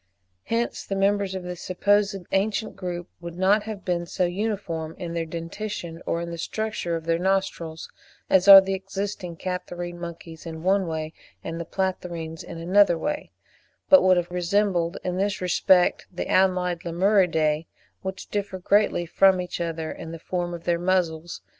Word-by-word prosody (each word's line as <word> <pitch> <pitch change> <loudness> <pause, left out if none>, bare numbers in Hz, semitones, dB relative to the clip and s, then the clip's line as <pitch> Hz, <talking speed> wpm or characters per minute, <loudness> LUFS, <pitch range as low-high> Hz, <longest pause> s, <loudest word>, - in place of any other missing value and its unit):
Hence 230 +1 -1
the 195 - -4
members 195 0 +1
of 185 - -4
this 180 -1 -6
supposed 200 +2 +2 0.2
ancient 210 +3 0
group 175 -1 -5
would 170 0 -8
not 195 +3 +4
have 215 -3 -7
been 175 -1 -1
so 180 - 0
uniform 175 -4 -3
in 170 -1 -5
their 165 -1 -2
dentition, 170 +1 -6
or 170 - 0
in 170 0 -5
the 170 - -6
structure 215 -3 -2
of 165 -1 -5
their 165 0 +1
nostrils, 185 -4 -1 0.4
as 190 0 +3
are 195 -1 +13
the 195 0 -2
existing 195 -2 -4
Catarrhine 175 -1 -5
monkeys 170 -1 -8
in 160 0 -7
one 190 0 +2
way 160 -1 -4 0.3
and 165 +1 -4
the - - -5
Platyrrhines 170 -3 -3
in 170 - -8
another 175 +1 +4
way, 295 - -3 0.6
but 285 - +9
would 185 -1 +5
have 175 0 -1
resembled 180 -1 +1
in 180 0 -2
this 200 +1 0
respect 180 0 +3
the 180 - -4
allied 180 -2 +2
Lemuridae, 170 -4 +2 0.3
which 190 0 -6
differ 205 -2 -2
greatly 195 -1 +2
from 190 +2 +4
each 180 -1 -4
other 165 -1 -3
in 165 - -8
the 165 - -6
form 175 +1 -3
of 170 - -10
their 170 -1 +1
muzzles 175 -2 -1
(15. - - -45
180 Hz, 170 wpm, -25 LUFS, 170-195 Hz, 0.6 s, are